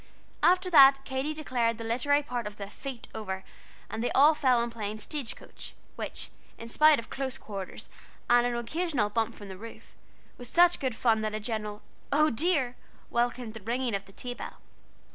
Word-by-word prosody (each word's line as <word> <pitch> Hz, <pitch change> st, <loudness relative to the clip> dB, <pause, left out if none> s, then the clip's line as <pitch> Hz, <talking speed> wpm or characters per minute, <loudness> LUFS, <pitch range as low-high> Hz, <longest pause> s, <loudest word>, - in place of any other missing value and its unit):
After 365 Hz, +1 st, +4 dB
that 275 Hz, -3 st, +8 dB
Katy 265 Hz, +3 st, -2 dB
declared 240 Hz, -7 st, 0 dB
the 230 Hz, -, -6 dB
literary 260 Hz, +6 st, +2 dB
part 245 Hz, -5 st, -3 dB
of 210 Hz, 0 st, -9 dB
the 200 Hz, 0 st, -7 dB
"Feet" 265 Hz, -2 st, -7 dB
over, 190 Hz, -3 st, -4 dB, 0.4 s
and 225 Hz, -, -4 dB
they -, -, +1 dB
all 295 Hz, +4 st, +7 dB
fell 260 Hz, -5 st, +3 dB
to -, -, -4 dB
playing 215 Hz, -2 st, -5 dB
"Stagecoach," 270 Hz, +2 st, -7 dB, 0.2 s
which, -, -, -5 dB, 0.3 s
in 230 Hz, -, -8 dB
spite 305 Hz, +4 st, +6 dB
of 230 Hz, -, -7 dB
close 265 Hz, -1 st, -3 dB
quarters 195 Hz, -3 st, -7 dB, 0.4 s
and 240 Hz, 0 st, +5 dB
an 240 Hz, -, -1 dB
occasional 255 Hz, -3 st, -1 dB
bump 225 Hz, +1 st, 0 dB
from 205 Hz, -, -10 dB
the 190 Hz, -1 st, -8 dB
roof, 225 Hz, +3 st, -11 dB, 0.5 s
was 245 Hz, -1 st, -4 dB
such 350 Hz, +3 st, +5 dB
good 260 Hz, -5 st, -1 dB
fun, 225 Hz, -2 st, +2 dB
that 215 Hz, 0 st, -2 dB
a -, -, -2 dB
general 210 Hz, -1 st, -4 dB, 0.3 s
"Oh 305 Hz, +2 st, +4 dB
dear!" 265 Hz, -1 st, +1 dB, 0.4 s
welcomed 240 Hz, -1 st, 0 dB
the 220 Hz, -, -9 dB
ringing 240 Hz, +3 st, -1 dB
of 200 Hz, 0 st, -2 dB
the 195 Hz, -, -16 dB
tea 245 Hz, +4 st, -5 dB
bell. -, -, -8 dB
240 Hz, 185 wpm, -29 LUFS, 220-275 Hz, 0.5 s, that